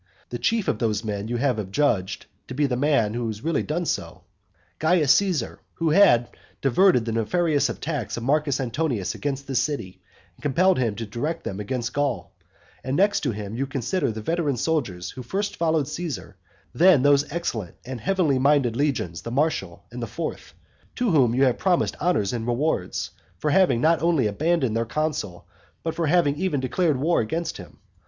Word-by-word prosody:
And - - -35
the - - -4
chief 225 -3 0
of 105 - 0
those 110 -2 0
men 105 -1 -3
you 120 +1 -2
have 125 -3 +1
adjudged 100 -1 0 0.2
to 130 - -7
be 145 +2 +2
the 130 -3 0
man 130 -5 +2
who 120 -1 -2
really 165 -1 +1
has - - -7
done 170 +3 -1
so, - - -3 0.6
Caius 160 -3 +3
Caesar, 180 - 0 0.2
who 165 -2 0
had 120 -10 +5 0.3
diverted 135 - +3
the 115 - -2
nefarious 145 +7 +1
attacks 145 -8 -4
of 115 - -5
Marcus 145 +1 +1
Antonius 125 - -1
against 140 -1 -4
this 135 -2 0
city, 140 -12 -3 0.3
and - - -23
compelled 180 +5 +3
him 115 -5 0
to 115 - -5
direct 120 +10 -3
them 95 - -5
against 120 +3 -3
Gaul; 145 -3 -2 0.5
and 130 +1 -1
next 200 +2 +3
to - - -1
him 105 -1 -6
you 135 +3 -2
consider 135 - -1
the 110 0 -7
veteran 160 -2 0
soldiers 110 - -1
who 130 - -8
first 195 - -3
followed 160 -4 +1
Caesar; 155 - -5 0.4
then 170 -6 +5
those 145 0 +3
excellent 115 - -3
and 125 -1 -6
heavenly 180 -8 +1
minded 135 -4 +3
legions 125 - -1
the 115 - -6
Martial 150 +6 -1
and - - -7
the - - -3
fourth, - - -6 0.4
to 245 -4 +1
whom 125 -7 +3
you 135 - +3
have 130 -3 +2
promised 180 -3 +1
honours 150 - +1
and 115 -1 -3
rewards, 120 - -1 0.3
for 150 +11 -1
having 185 -8 +4
not 165 +1 +3
only 165 -7 +2
abandoned 135 +2 +1
their 115 - +1
consul, 115 - -3 0.4
but 165 - -2
for 165 -2 -1
having 145 -3 +3
even 180 -5 0
declared 150 +3 +1
war 160 +6 +2
against 165 +10 -3
him. - - -12
140 Hz, 190 wpm, -24 LUFS, 115-165 Hz, 0.6 s, had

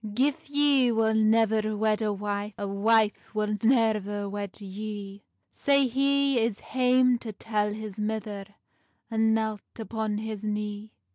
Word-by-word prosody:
"Gif 275 +3 0
ye 285 -4 +3
wull 220 -1 +2
nevir 220 -1 +2
wed 215 0 +1
a 215 -1 +1
wife, 205 0 -3
A 200 - -3
wife 215 +2 +1
wull 210 0 -1
neir 215 -4 +2
wed 205 -1 -6
yee;" 200 0 -7 0.3
Sae 280 -1 +3
he 275 +1 +2
is 225 -2 0
hame 250 -1 +2
to 225 - -6
tell 210 0 -1
his 215 -1 -7
mither, 210 -2 -3 0.7
And 220 0 +3
knelt 220 -2 -1 0.2
upon 220 -2 -3
his 215 -1 -5
knee. 210 0 -4
215 Hz, 140 wpm, -27 LUFS, 210-230 Hz, 0.7 s, ye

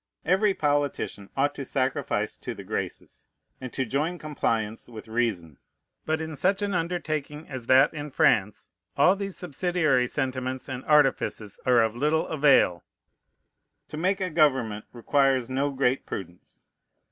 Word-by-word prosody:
Every 195 +2 +3
politician 145 -8 -1
ought 145 +1 +2
to 140 - -6
sacrifice 130 -1 -1
to - - -7
the - - -9
Graces, - - -5 0.3
and 130 -2 -6
to 130 - -1
join 150 +9 -1
compliance 115 -9 -2
with 110 -1 -10
reason. 110 - -2 0.5
But 160 0 0
in 160 -1 -5
such 195 +7 +1
an 200 -1 -1
undertaking 155 -3 -3
as 130 -4 -7
that 135 +4 +5
in 150 -1 -6
France 105 -6 +1 0.3
all 160 +7 +5
these 195 -1 -4
subsidiary 160 -6 +1
sentiments 130 -1 -3
and 130 -1 -5
artifices 135 -8 +2
are 120 -2 +5
of 110 0 -1
little 150 +5 +1
avail. 140 - +3 1.1
To 150 - -7
make 190 +5 +1
a 185 -2 -2
government 130 -9 +2
requires 130 +1 +1
no 140 +2 0
great 135 -1 0
prudence. 90 -2 -8
140 Hz, 145 wpm, -26 LUFS, 125-155 Hz, 1.1 s, that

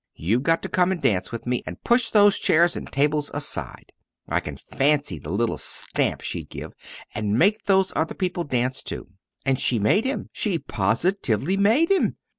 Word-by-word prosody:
you've 105 +10 0
got 165 +4 +1
to - - -2
come 180 0 +2
and 185 - -3
dance 95 -4 +1
with 115 - -6
me, 125 0 -1
and 90 +2 -8
push 240 -1 +3
those 205 -2 +5
chairs 170 +2 +3
and - - -7
tables 145 +1 +1
aside' 145 0 -4 0.4
I - - +1
can - - -7
fancy 140 - 0
the 75 - -9
little 115 +6 -1
stamp - - -1
she'd - - -5
give - - -8 0.4
'and 105 0 -1
make 205 - +2
those 190 -1 +2
other 160 - -1
people 180 -2 -2
dance 130 -2 -1
too.' - - -7 0.4
And 135 -1 +1
she 120 - +1
made 110 - +2
him 270 +2 -3
she 200 -6 -1
positively 135 - 0
made 225 - +3
him. 390 - +2
150 Hz, 185 wpm, -24 LUFS, 120-195 Hz, 0.4 s, those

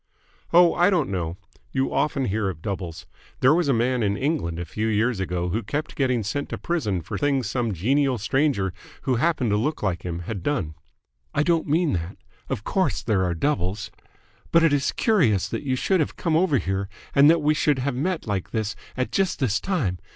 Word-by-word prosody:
"Oh, 175 0 +6
I 175 +2 +4
don't 170 - +1
know. 85 -2 -3 0.3
You 130 0 0
often 140 -2 +1
hear 105 -1 0
of 85 -3 -8
doubles. 90 -5 -5 0.4
There 130 +3 +6
was 170 -1 +2
a - - +3
man 125 +1 +1
in 100 -2 +1
England 135 - -1
a 85 - -4
few 110 +6 -2
years 110 +1 +1
ago 90 -2 -2
who 110 +6 -1
kept 145 +9 -3
getting 125 -4 +1
sent 140 +8 -3
to - - -4
prison 110 - -1
for - - -5
things 140 -3 +1
some 120 -3 -1
genial 130 - +1
stranger 110 - +1 0.3
who 130 -4 +1
happened 135 -5 +1
to 105 - +3
look 150 +6 -1
like 90 -4 0
him 85 -1 -4
had 95 +2 -5
done." 95 - -1 0.6
"I 150 - +3
don't 165 0 +1
mean 160 +2 +2
that. 85 +1 -3 0.3
Of 105 - -3
course 190 - 0
there 100 -5 +1
are 90 -2 0
doubles. 105 - -1 0.6
But 165 0 +5
it 165 -3 +4
is 140 -1 +1
curious 155 - +2
that - - -3
you 130 -3 -1
should 185 +8 +1
have 155 - -1
come 165 -3 0
over 160 -4 +3
here 95 -2 -2 0.2
and 140 +1 +7
that 165 -1 +4
we 150 +1 +4
should 150 -1 +2
have 135 +1 -1
met 165 +7 -2
like 100 -5 -2
this 110 -2 -2 0.2
at 130 - -1
just 190 -2 +1
this 125 -7 +1
time. 130 - -1
125 Hz, 210 wpm, -24 LUFS, 100-150 Hz, 0.6 s, and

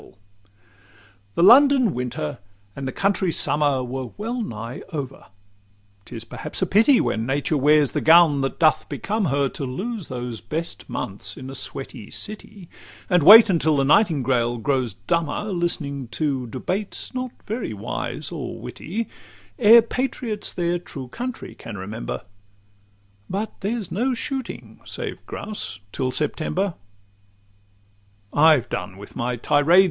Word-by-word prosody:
XLVIII - - -18 1.2
The 170 - +2
London 265 0 +7
winter 120 -12 -4 0.4
and 135 -1 -5
the - - -2
country 195 +1 +1
summer 145 -4 +2
Were 130 0 -5
well 235 +4 -3
nigh 115 - -6
over. 135 -7 -6 0.8
'T - - -10
is 115 - -6
perhaps 115 - -5
a - - +3
pity, 225 +8 +5
When 110 +1 -1
nature 145 +3 0
wears 150 0 +4
the - - -1
gown 160 -3 +6
that 135 - -2
doth 155 -2 +3
become 210 0 -2
her, 140 -2 +1
To 145 - -6
lose 190 - -4
those 120 -3 -5
best 165 +2 -4
months - - -5
in 130 +1 -8
a - - -8
sweaty 130 -4 -4
city, 205 -3 -6 0.4
And 180 -1 +5
wait 215 +9 +10
until 160 -5 +2
the 135 - +2
nightingale 130 - +2
grows 125 -3 -1
dumber, 160 - -1
Listening 145 -7 -2
debates 140 - -3
not 255 0 -3 0.2
very 220 - -3
wise 105 -2 -4
or - - -6
witty, 215 +8 -5 0.5
Ere 230 0 +8
patriots 235 -3 -2
their 175 0 -1
true 135 -7 -8
country 250 - -6
can 110 -3 -9
remember; 105 +5 -5 1.1
But 205 +4 -3
there's 210 -1 -3
no 250 +7 0
shooting 265 0 -5
(save - - -6
grouse) 205 - -5
till 130 +4 -1
September. 160 +7 -1 1.6
XLIX - - -2
I've 150 -6 +5
done 90 +1 -5
with 100 +1 -12
my 120 +1 -1
tirade. 145 +8 +4
155 Hz, 140 wpm, -23 LUFS, 130-205 Hz, 1.6 s, wait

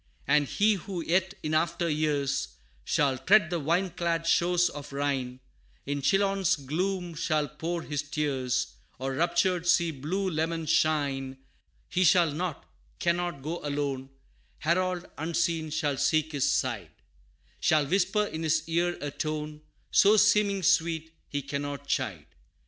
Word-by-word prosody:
And 145 +1 +3
he 215 +8 +3
who 190 -4 -5
yet 185 +3 +1
in 155 0 -2
after 170 +2 +1
years, 145 - 0 0.4
Shall 135 - +1
tread 185 - +4
the 175 - 0
vine 170 +5 0
clad 165 -1 -1
shores 175 +1 +3
of 145 -1 -8
Rhine, 135 -3 -2 0.4
In 145 0 -2
Chillon's 195 +3 +2
gloom 175 +5 -2
shall 155 -2 0
pour 165 +3 -4
his 145 -2 -2
tears, 135 -4 -1 0.2
Or 135 +1 -3
raptured, 175 +3 +1
see 170 -2 +4
blue 160 +8 -2
Leman 165 -1 -1
shine 140 -4 +1 0.5
He 185 - +1
shall 175 -2 +5
not 170 +1 -4 0.3
cannot, 175 -4 -1
go 165 +4 -4
alone 140 -2 -2 0.5
Harold 180 +2 0
unseen 165 0 0
shall 145 -2 -1
seek 155 +2 +1
his 140 -4 +1
side: - - -1 0.7
Shall 155 -2 +3
whisper 195 +6 +1
in 160 -5 -5
his 160 0 +1
ear 175 +2 0
a 145 - -3
tone, 150 0 -4 0.3
So 205 +2 +6
seeming 205 -2 +3
sweet, 160 0 +1 0.2
he 145 -1 -3
cannot 140 0 -4
chide. 140 - -2
160 Hz, 140 wpm, -28 LUFS, 145-175 Hz, 0.7 s, So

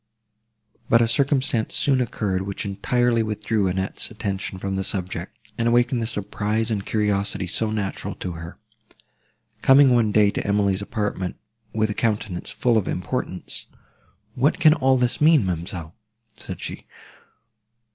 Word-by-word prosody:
But 115 0 +5
a - - +2
circumstance 130 -2 +1
soon 135 -3 +3
occurred, 105 -5 -1
which 100 +3 -4
entirely 115 +4 +1
withdrew 105 -1 0
Annette's 95 +1 -2
attention 100 -4 -4
from 95 +1 -3
this 95 0 -2
subject, 90 -2 -5
and 115 - +2
awakened 120 +1 +3
the 115 - -1
surprise 110 +1 -2
and 100 -3 -1
curiosity 105 -3 0
so 105 +5 0
natural 105 -3 -3
to 90 - -5
her. 85 0 -8 1.0
Coming 135 -1 +6
one 115 -3 +3
day 105 -1 +4
to - - -3
Emily's 100 -1 +1
apartment, 100 -4 -3 0.4
with 110 -1 0
a - - -1
countenance 105 -5 -2
full 120 -3 +2
of 100 - -5
importance, 90 0 -3 0.7
"What 145 +9 +1
can 155 -2 +7
all 135 -4 +3
this 125 +2 0
mean, 155 -7 +5
ma'amselle?" 85 -2 -4 0.4
said - - -7
she. - - -7
105 Hz, 145 wpm, -23 LUFS, 95-120 Hz, 1.0 s, can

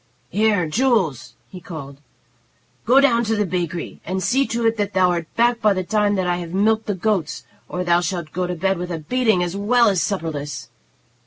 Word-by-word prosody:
"Here, 205 -3 +2
Jules," 170 - 0
he 185 - -11
called. 140 -5 -9 0.9
"Go 255 +3 +6
down 240 -4 +3
to 220 +1 0
the 210 -1 +1
bakery, 175 -2 -4
and 185 +1 -3
see 265 +8 +2
to 235 0 -2
it 225 0 +3
that 205 -1 -2
thou 185 -1 +3
art 170 -2 -2
back 235 0 +2
by 210 -2 +4
the 185 - -1
time 205 +1 +1
that 185 -2 -1
I 175 0 0
have 175 0 -6
milked 220 +2 +2
the 205 - -1
goats, 185 -4 -1 0.3
or 180 - -3
thou 175 0 +3
shalt 175 -4 -3
go 180 +1 -1
to 180 - -3
bed 190 +1 0
with 180 0 -4
a 170 - -2
beating, 220 +3 +1
as 175 +1 -3
well 230 +3 +3
as 190 -4 +1
supperless. 145 - -4
185 Hz, 210 wpm, -21 LUFS, 170-220 Hz, 0.9 s, Go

